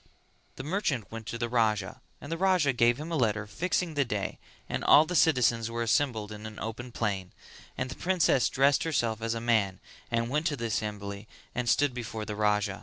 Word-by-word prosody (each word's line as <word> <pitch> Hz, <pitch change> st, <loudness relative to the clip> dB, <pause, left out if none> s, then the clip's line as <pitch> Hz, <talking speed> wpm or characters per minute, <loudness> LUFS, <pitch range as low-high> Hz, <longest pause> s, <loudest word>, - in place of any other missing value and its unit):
The 130 Hz, -, -7 dB
merchant 145 Hz, -, -1 dB
went 115 Hz, -1 st, -7 dB
to 120 Hz, -, -4 dB
the 120 Hz, 0 st, -1 dB
Raja 110 Hz, -5 st, 0 dB, 0.2 s
and 145 Hz, -, -9 dB
the 165 Hz, -, -1 dB
Raja 180 Hz, -7 st, +3 dB
gave 120 Hz, +1 st, +3 dB
him 160 Hz, +3 st, -6 dB
a -, -, 0 dB
letter 110 Hz, -6 st, +1 dB
fixing 170 Hz, -, -1 dB
the 145 Hz, -1 st, +2 dB
day 105 Hz, -6 st, -3 dB, 0.3 s
and -, -, -3 dB
all 155 Hz, -, +7 dB
the 180 Hz, -, -4 dB
citizens 120 Hz, -8 st, +3 dB
were 115 Hz, 0 st, -2 dB
assembled 110 Hz, -3 st, 0 dB
in 105 Hz, +1 st, -7 dB
an 110 Hz, -, -10 dB
open 115 Hz, +3 st, -6 dB
plain; 100 Hz, -5 st, -2 dB, 0.4 s
and 130 Hz, -, -1 dB
the 130 Hz, -, -6 dB
princess 175 Hz, -8 st, +2 dB
dressed 135 Hz, +1 st, +3 dB
herself 115 Hz, -9 st, 0 dB
as 115 Hz, 0 st, -1 dB
a -, -, -2 dB
man 110 Hz, -5 st, +1 dB, 0.3 s
and 115 Hz, +1 st, -1 dB
went 150 Hz, +3 st, +1 dB
to 150 Hz, -, 0 dB
the 115 Hz, -3 st, -4 dB
assembly 105 Hz, -2 st, -3 dB, 0.3 s
and 125 Hz, -1 st, -1 dB
stood 145 Hz, 0 st, +3 dB
before 115 Hz, -3 st, -5 dB
the 105 Hz, -, -5 dB
Raja. 105 Hz, -1 st, +1 dB
115 Hz, 205 wpm, -29 LUFS, 105-140 Hz, 0.4 s, all